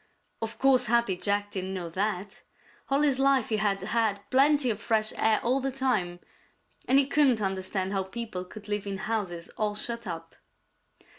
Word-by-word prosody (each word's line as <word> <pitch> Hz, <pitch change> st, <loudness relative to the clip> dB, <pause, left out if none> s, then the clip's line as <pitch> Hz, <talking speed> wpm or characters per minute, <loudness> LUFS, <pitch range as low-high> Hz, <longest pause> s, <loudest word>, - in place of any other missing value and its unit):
Of 225 Hz, 0 st, -4 dB
course 260 Hz, -2 st, +4 dB
Happy 235 Hz, -4 st, +2 dB
Jack 205 Hz, +2 st, -1 dB
didn't 190 Hz, -1 st, -4 dB
know 175 Hz, -2 st, -4 dB
that. 195 Hz, +2 st, -3 dB, 0.5 s
All 275 Hz, +2 st, +2 dB
his 275 Hz, -3 st, +2 dB
life 270 Hz, -3 st, +3 dB
he 220 Hz, -, +1 dB
had 200 Hz, -2 st, 0 dB
had 215 Hz, -1 st, 0 dB
plenty 275 Hz, -1 st, +4 dB
of 215 Hz, 0 st, -5 dB
fresh 220 Hz, -2 st, +1 dB
air 220 Hz, -1 st, +3 dB
all 255 Hz, +3 st, +2 dB
the 270 Hz, 0 st, -1 dB
time, 225 Hz, -10 st, -1 dB, 0.7 s
and 260 Hz, -, +4 dB
be 280 Hz, -, +5 dB
couldn't 275 Hz, -4 st, +3 dB
understand 190 Hz, -1 st, -2 dB
how 195 Hz, -, +1 dB
people 190 Hz, -1 st, -5 dB
could 205 Hz, +3 st, -12 dB
live 205 Hz, -1 st, -2 dB
in 195 Hz, -1 st, -3 dB
houses 190 Hz, -5 st, -3 dB
all 210 Hz, -1 st, -1 dB
shut 235 Hz, +1 st, -4 dB
up. 165 Hz, -1 st, -7 dB
215 Hz, 175 wpm, -28 LUFS, 195-245 Hz, 0.7 s, be